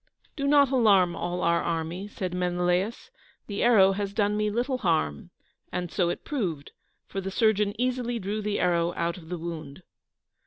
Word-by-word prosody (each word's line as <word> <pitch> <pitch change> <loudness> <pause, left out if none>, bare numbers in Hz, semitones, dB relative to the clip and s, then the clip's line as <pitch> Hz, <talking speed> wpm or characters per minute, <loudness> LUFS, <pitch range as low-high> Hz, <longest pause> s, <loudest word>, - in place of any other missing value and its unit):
"Do 280 -2 -2
not 280 -2 +5
alarm 200 -9 +4
all 175 +1 -3
our 170 0 +3
army," 170 +3 -3
said 185 -3 -5
Menelaus, 180 +4 -1 0.3
"the 200 -1 -4
arrow 205 -5 +6
has 200 0 -3
done 205 -1 +2
me 210 0 +1
little 250 +4 -1
harm;" 160 - 0 0.4
and 180 -1 -3
so 180 -3 +1
it - - -4
proved, 175 - -3 0.3
for 195 - -5
the 195 - -4
surgeon 210 0 +1
easily 245 -1 -1
drew 210 +1 -3
the 210 0 -1
arrow 170 -1 +1
out 170 +1 -2
of 160 -2 -14
the 180 - -3
wound. 160 -1 -7
190 Hz, 170 wpm, -27 LUFS, 175-215 Hz, 0.4 s, arrow